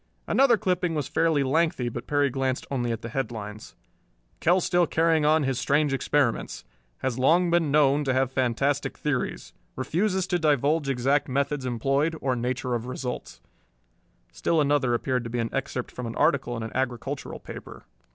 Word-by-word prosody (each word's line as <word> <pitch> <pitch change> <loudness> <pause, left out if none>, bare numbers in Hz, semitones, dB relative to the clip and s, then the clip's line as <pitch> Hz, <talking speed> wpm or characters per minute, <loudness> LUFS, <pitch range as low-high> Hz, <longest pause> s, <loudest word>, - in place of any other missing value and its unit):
Another 260 -4 +4
clipping 180 -4 0
was 150 -4 -2
fairly 160 -3 +2
lengthy, 140 -2 +1
but 120 0 -5
Perry 145 -2 +2
glanced 130 0 -1
only 120 -3 -1
at 115 0 -4
the 115 - -5
headlines: 110 -4 -5 0.6
KELL 175 +3 +3
STILL 175 -1 +2
CARRYING 160 -1 +2
ON 155 0 +4
HIS 135 -2 -1
STRANGE 145 +2 +2
EXPERIMENTS 135 -2 0 0.4
Has 130 -1 -1
Long 170 +6 +4
Been 170 -3 +2
Known 145 0 +3
to 130 - +1
Have 130 0 +1
Fantastic 130 +3 0
Theories. 145 -4 -3 0.2
Refuses 185 +8 0
to 180 -1 0
Divulge 150 -1 +2
Exact 135 +3 +1
Methods 140 0 -1
Employed, 135 +7 0
or 130 -2 0
Nature 125 +1 -2
of 120 0 -2
Results 125 - -5 0.9
Still 165 - 0
another 140 -4 +2
appeared 125 +1 -1
to 115 - -6
be 120 - -3
an 115 -1 -2
excerpt 130 -2 -3
from 125 -1 -6
an 115 - -6
article 125 -4 +1
in 115 - -4
an 110 - -5
agricultural 130 +2 -3
paper. - - -10
135 Hz, 170 wpm, -26 LUFS, 125-155 Hz, 0.9 s, Another